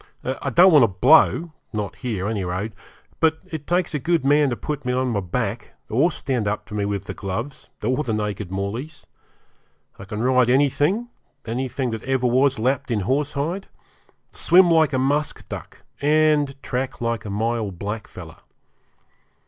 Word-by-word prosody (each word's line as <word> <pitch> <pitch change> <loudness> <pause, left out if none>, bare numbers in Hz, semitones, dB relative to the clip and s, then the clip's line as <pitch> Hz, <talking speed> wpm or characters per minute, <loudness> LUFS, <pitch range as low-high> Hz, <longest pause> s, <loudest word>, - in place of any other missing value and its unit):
I 130 +2 -3
don't 180 +8 +6
want 150 -4 +7
to 115 - +6
blow 155 - +4 0.2
not 105 -3 -4
here, 110 -7 -3
any 105 -3 -2
road 95 +5 -3 0.5
but 160 0 +3
it 160 -5 -7
takes 175 -1 +1
a 150 - -1
good 165 0 0
man 145 0 +4
to 120 - -1
put 150 +3 -5
me 125 - -1
on 130 0 0
my 105 - 0
back, 105 +3 -3 0.2
or 135 +10 +3
stand 130 -9 -2
up 105 +1 -2
to - - -9
me 105 -1 -1
with 100 -2 -3
the - - -5
gloves, 115 +8 -5
or 130 +4 +1
the 120 - -3
naked 105 -3 -3
mauleys. 100 - -5 0.9
I 100 - -8
can 105 +3 -4
ride 125 -1 +3
anything 145 - +2 0.4
anything 125 +2 -2
that 110 -1 -4
ever 130 0 -1
was 130 +2 +3
lapped 135 +4 0
in 110 -4 0
horsehide 145 - -1 0.6
swim 180 0 +4
like 160 -3 +4
a - - +2
musk 145 +4 -1
duck, - - -8 0.2
and 150 -2 +2
track 125 +1 -3
like 115 -2 -2
a 105 - -6
Myall 110 +1 -1
blackfellow. 105 +4 -7
130 Hz, 170 wpm, -22 LUFS, 110-145 Hz, 0.9 s, want